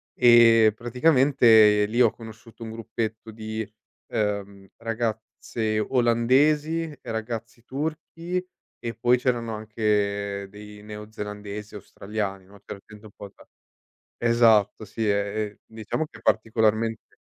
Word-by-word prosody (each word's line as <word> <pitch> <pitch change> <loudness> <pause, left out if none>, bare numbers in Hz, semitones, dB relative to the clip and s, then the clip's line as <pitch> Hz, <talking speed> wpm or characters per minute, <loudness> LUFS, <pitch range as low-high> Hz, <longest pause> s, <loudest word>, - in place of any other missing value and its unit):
e 115 -2 +6
praticamente 120 -5 +4
lì 120 +3 -2
ho 115 -3 +5
conosciuto 115 0 -13
un 110 - -6
gruppetto 110 0 -5
di, 110 -1 -5 0.4
ehm, 100 -2 -3
ragazze 110 -1 -3
olandesi 135 +8 +2
e 155 -3 -9
ragazzi 115 +1 -5
turchi 160 +5 -4 0.4
e 115 -1 -5
poi 125 +1 +3
c'erano 120 -3 -1
anche 100 -2 -1
dei 105 0 -12
neozelandesi 105 -1 -8
e - - -6
australiani, 100 -1 -5
no, 100 +1 -17
c'era 100 - -8
gente 110 0 -15
un 105 - -12
po' 100 -1 -10
da - - -17 0.8
esatto, 115 -3 +3
sì, 110 +2 -3
ehm, 100 +1 -2
diciamo 110 +8 -4
che - - -15
è - - -19
particolarmente 110 0 0
110 Hz, 120 wpm, -25 LUFS, 105-120 Hz, 0.8 s, e